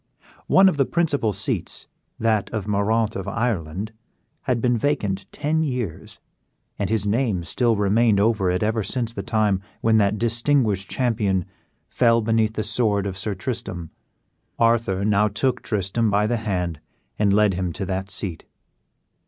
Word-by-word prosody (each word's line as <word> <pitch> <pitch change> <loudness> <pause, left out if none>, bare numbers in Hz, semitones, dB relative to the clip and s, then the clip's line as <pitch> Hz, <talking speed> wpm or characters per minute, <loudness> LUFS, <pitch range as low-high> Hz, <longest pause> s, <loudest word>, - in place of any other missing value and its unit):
One 195 0 +6
of 185 - +2
the 135 - +2
principal 145 -10 +1
seats, 100 0 -2 0.3
that 110 -3 +1
of 105 -3 -4
Moraunt 105 +2 +1
of 95 - -4
Ireland, 105 -3 -2 0.5
had 125 -4 +1
been 120 +1 +2
vacant 105 -7 -1
ten 155 +2 0
years, 125 - -4 0.6
and 100 - -1
his 110 -2 0
name 105 -4 0
still 115 +7 +1
remained 105 +1 +3
over 105 -3 +2
it 90 +3 0
ever 110 +1 +1
since 115 +3 -3
the - - -4
time 105 -4 +1 0.2
when 110 0 +3
that 100 0 +2
distinguished 115 -3 +1
champion 105 -8 0 0.4
fell 115 -2 +3
beneath 110 0 +1
the 110 - -1
sword 105 -2 +1
of 95 -2 -3
Sir 100 +2 -3
Tristram. 100 - -4 0.7
Arthur 115 -4 +2
now 105 0 +3
took 115 +5 -1
Tristram 105 +2 0
by 105 +1 +2
the 120 +2 0
hand 90 -7 -2 0.4
and 105 -2 +3
led 105 0 +4
him 90 -1 -2
to 95 - -4
that 95 +1 -3
seat. 90 -3 -5
105 Hz, 155 wpm, -23 LUFS, 100-115 Hz, 0.7 s, One